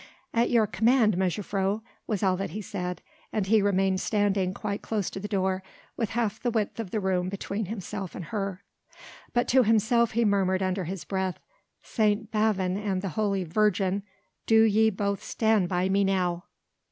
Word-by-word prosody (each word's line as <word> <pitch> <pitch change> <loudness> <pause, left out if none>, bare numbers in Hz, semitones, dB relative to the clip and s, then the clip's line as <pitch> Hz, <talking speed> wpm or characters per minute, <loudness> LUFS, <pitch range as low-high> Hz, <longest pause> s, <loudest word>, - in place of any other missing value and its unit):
"At 235 +1 +2
your 230 -3 +4
command, 225 0 +3
mejuffrouw," 195 +2 -1 0.3
was 210 -3 -1
all 190 -1 +3
that 195 - -3
he 205 +7 -5
said, 180 -1 -4 0.3
and 210 -3 0
he 215 +2 +4
remained 195 -1 +2
standing 200 -3 +1
quite 200 +1 -4
close 210 -4 -2
to - - -6
the 205 - -5
door, 190 -2 0 0.3
with 225 -3 -1
half 220 -2 0
the 245 - 0
width 220 -1 -1
of 220 -5 -4
the 215 - -1
room 185 -2 0
between 200 +2 -3
himself 195 -1 -5
and 180 - -6
her. 195 +1 -4 0.7
But 240 0 +1
to 260 +1 +6
himself 225 +1 +3
he 235 +1 +2
murmured 190 -2 +2
under 185 0 -1
his 175 -1 -5
breath: 190 -1 -2 0.4
"St. 215 0 0
Bavon 200 -4 +1
and 200 -2 -2
the 195 - -1
Holy 195 +1 0
Virgin, 195 +2 +1 0.5
do 220 0 +6
ye 220 0 +4
both 200 -1 -2
stand 220 -5 +1
by 180 0 +1
me 195 +1 +2
now!" 180 -2 0
200 Hz, 175 wpm, -27 LUFS, 190-220 Hz, 0.7 s, to